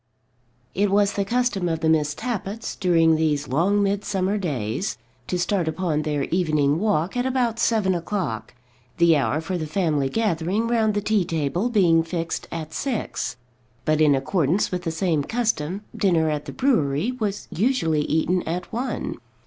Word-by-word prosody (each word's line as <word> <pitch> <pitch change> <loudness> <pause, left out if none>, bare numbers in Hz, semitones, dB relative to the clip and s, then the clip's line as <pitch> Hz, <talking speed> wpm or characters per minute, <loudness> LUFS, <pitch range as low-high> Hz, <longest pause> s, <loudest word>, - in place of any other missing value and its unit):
It 205 +1 +1
was 200 +1 +3
the 200 - 0
custom 220 -4 0
of 160 -1 -2
the 160 - +1
Miss 150 -2 +2
Tappitts, 225 -2 -4
during 165 -4 +3
these 150 -2 0
long 185 +10 +2
midsummer 200 0 0
days, 135 - -2 0.3
to 180 - -1
start 180 -1 0
upon 160 -2 0
their 150 -2 -1
evening 155 -4 +2
walk 195 -3 0
at 245 +1 0
about 245 -3 0
seven 215 -5 +2
o'clock, 170 - -3 0.4
the 170 -1 +5
hour 145 +1 +1
for 175 +3 -3
the 155 - -3
family 155 -5 0
gathering 200 +1 0
round 220 -3 +2
the 205 - +1
tea 210 -1 +2
table 165 - -1
being 175 -8 +4
fixed 165 0 -4
at 160 -1 -5
six. 245 - -3 0.5
But, 155 0 +2
in 150 -2 +5
accordance 160 +6 +1
with 180 0 -3
the 165 - 0
same 160 -2 0
custom, 205 -5 -1
dinner 165 -5 +2
at 150 -1 -3
the - - -6
brewery 190 - +1
was 210 -5 -3
usually 185 - +1
eaten 160 +4 +1
at 175 +5 -4
one. 250 +3 -3
180 Hz, 165 wpm, -23 LUFS, 155-205 Hz, 0.5 s, the